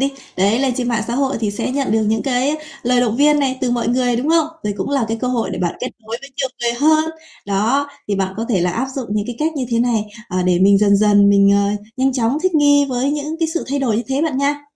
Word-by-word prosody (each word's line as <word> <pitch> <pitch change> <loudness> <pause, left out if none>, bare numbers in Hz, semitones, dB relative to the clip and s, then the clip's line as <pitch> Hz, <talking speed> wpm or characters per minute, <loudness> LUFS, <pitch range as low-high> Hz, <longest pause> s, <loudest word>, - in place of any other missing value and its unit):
đi. 275 +1 0 0.2
Đấy, 200 +5 +2
lên 265 -2 0
trên 245 -1 -2
mạng 230 -3 0
xã 235 - -3
hội 270 0 0
thì 210 - 0
sẽ 205 +5 -3
nhận 275 -4 -1
được 220 -1 +2
những 220 0 0
cái 255 +3 0
á 310 - -1 0.3
lời 250 0 +2
động 235 -2 0
viên 295 +1 +4
này 260 -2 0
từ 250 -2 0
mọi 240 -1 0
người, 245 -1 +1
đúng 270 +6 -2
hông? 325 -2 +3 0.2
Đây 205 -1 -1
cũng - - -3
là 275 -5 +1
cái 225 - -1
cơ 250 - -1
hội 230 -6 -1
để - - -4
bạn 175 -2 -1
kết 250 - -2
nối 225 +2 -5
với 275 - -12
nhiều 265 - -1
người 235 0 +1
hơn. 310 +5 +3 0.4
Đó, 230 +9 +1 0.2
thì 205 - 0
bạn 190 0 -2
có 225 - -2
thể 195 -7 +1
là 175 0 +1
áp 265 - -2
dụng 255 -3 -3
những 210 -1 -1
cái 245 - -6
cách 315 +1 0
như 260 - -1
thế 230 - +1
này, 235 -3 +1 0.2
ờ, 185 0 -1
để 180 -1 +2
mình 195 +1 +5
dần 200 -1 +4
dần 205 -1 +4
mình, 200 0 +5
ờ, 200 0 +2 0.3
nhanh 265 +1 +1
chóng 250 +3 0
thích 370 -3 0
nghi 285 -1 +4
với 255 +2 0
những 300 +2 -3
cái 325 -1 0
sự 340 - -2
thay 280 - -1
đổi 240 -6 0
như 235 - -1
thế 270 +2 0
bạn 300 -5 -1
nha. 290 +1 -1
245 Hz, 295 wpm, -18 LUFS, 210-280 Hz, 0.4 s, mình